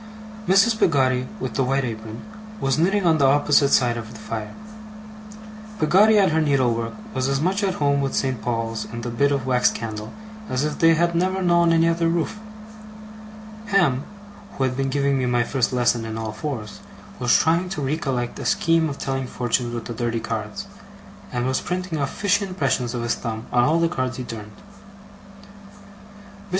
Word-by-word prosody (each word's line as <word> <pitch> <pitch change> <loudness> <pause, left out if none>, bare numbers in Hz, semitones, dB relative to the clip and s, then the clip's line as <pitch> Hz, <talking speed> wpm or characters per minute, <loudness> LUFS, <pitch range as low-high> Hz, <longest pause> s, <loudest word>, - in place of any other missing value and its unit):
Mrs. 210 +4 +4
Peggotty 130 -5 +2
with - - -4
the 135 - +1
white 135 +2 +1
apron, 110 -1 -6 0.4
was 135 -1 0
knitting 195 +3 +2
on 160 -2 +4
the 140 - +5
opposite 145 0 +4
side 120 -3 +3
of 110 -2 -7
the 110 - -11
fire. 110 -1 -6 1.2
Peggotty 200 +7 +5
at 195 -4 +4
her 160 +1 +2
needlework 125 -6 +1 0.2
was 130 0 -1
as 135 0 0
much 190 +6 0
at 190 -2 0
home 140 -1 +1
with 135 -1 -2
St. 130 -4 -1
Paul's 115 -2 -2
and 115 0 -6
the 120 - -3
bit 140 +5 +2
of 140 -3 -1
wax 125 -1 +3
candle, 110 -1 -6 0.4
as 130 +2 0
if 150 - -3
they 165 0 +5
had 170 +1 +1
never 185 +3 0
known 170 -1 +4
any 165 0 +4
other 165 0 +1
roof. 170 +5 -1 1.3
Ham, 175 - +2 0.5
who 135 - -2
had 130 -1 0
been 135 0 -1
giving 140 0 +1
me 130 - 0
my 120 -1 +2
first 130 +1 0
lesson 120 -2 +1
in 110 0 -5
all 110 -1 -4
fours, 110 -2 -6 0.4
was 120 -1 +4
trying 170 +3 +1
to 180 - -4
recollect 135 -4 -2
a - - -6
scheme 165 -1 +2
of 140 - -6
telling 135 -1 -3
fortunes 120 0 -1
with 115 - -5
the 120 - -5
dirty 115 0 -2
cards, - - -4 0.7
and 120 0 -1
was 130 0 0
printing 180 -3 -3
off 140 -1 -1
fishy 205 0 +1
impressions 135 -10 -1
of 120 - -3
his 120 - +1
thumb 110 -1 -5
on 120 -1 +4
all 160 +4 +2
the 165 - +3
cards 130 -6 -3
he 130 - -4
turned. 110 -3 -8
Mr. 200 - -19
135 Hz, 185 wpm, -23 LUFS, 120-170 Hz, 1.3 s, the